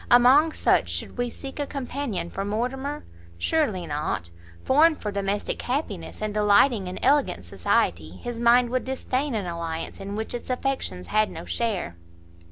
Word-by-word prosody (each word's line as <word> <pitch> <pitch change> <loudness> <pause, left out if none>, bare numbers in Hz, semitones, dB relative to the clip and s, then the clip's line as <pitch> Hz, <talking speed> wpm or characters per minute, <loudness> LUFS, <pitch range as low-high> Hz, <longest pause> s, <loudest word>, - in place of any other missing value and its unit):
Among 260 +6 +6
such - - +2
should - - -4
we 245 0 0
seek 270 +3 -9
a 290 - -1
companion 250 -10 -3
for 195 - -3
Mortimer? 255 +8 -3 0.3
surely 210 - 0
not. 145 - -3 0.3
Formed 310 +3 +4
for 210 - -3
domestic 200 0 -2
happiness, 220 - -3
and 215 -1 -2
delighting 210 0 +4
in 180 - -5
elegant 270 - +2
society, 85 -2 0
his 240 - -5
mind 240 +1 +5
would 255 0 0
disdain 265 0 -2
an 205 -3 -1
alliance 165 -1 -4
in 200 +1 -5
which 220 +2 -4
its 240 - -5
affections 255 - -2
had 215 0 +3
no - - -8
share." 200 - -2
225 Hz, 160 wpm, -25 LUFS, 185-265 Hz, 0.3 s, Among